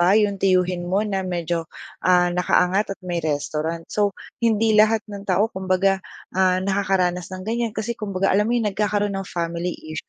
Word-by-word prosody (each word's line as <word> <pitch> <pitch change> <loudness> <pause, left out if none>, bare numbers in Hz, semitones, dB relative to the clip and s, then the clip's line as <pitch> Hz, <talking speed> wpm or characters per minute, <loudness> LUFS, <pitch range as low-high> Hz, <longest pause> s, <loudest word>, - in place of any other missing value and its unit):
ba 180 +4 +5
’yong 205 -2 +1
tiyuhin 180 -2 +1
mo 195 +4 +1
na 195 -3 -1
medyo, 170 -2 -2 0.3
ah, 180 -1 +3
naka-angat 185 +3 +1
at - - -75
may 175 -2 -2
restaurant 155 +2 -2
so, 205 -2 +1 0.2
hindi 225 -1 +2
lahat 215 0 +4
ng 200 -1 -9
tao 205 +5 +2
kumbaga, 190 +1 +1 0.3
ah, 185 0 +2
nakakaranas 190 -3 0
ng 185 0 -7
ganyan 230 0 -1
kasi, 215 +2 -2
kumbaga, 195 -4 -1
alam 210 +3 +2
mo 240 - +2
’yon, 210 -4 0
nagkakaroon 205 0 0
ng 195 0 -4
family 170 +1 -3 0.2
issue. 155 - -6
190 Hz, 180 wpm, -22 LUFS, 180-210 Hz, 0.3 s, ba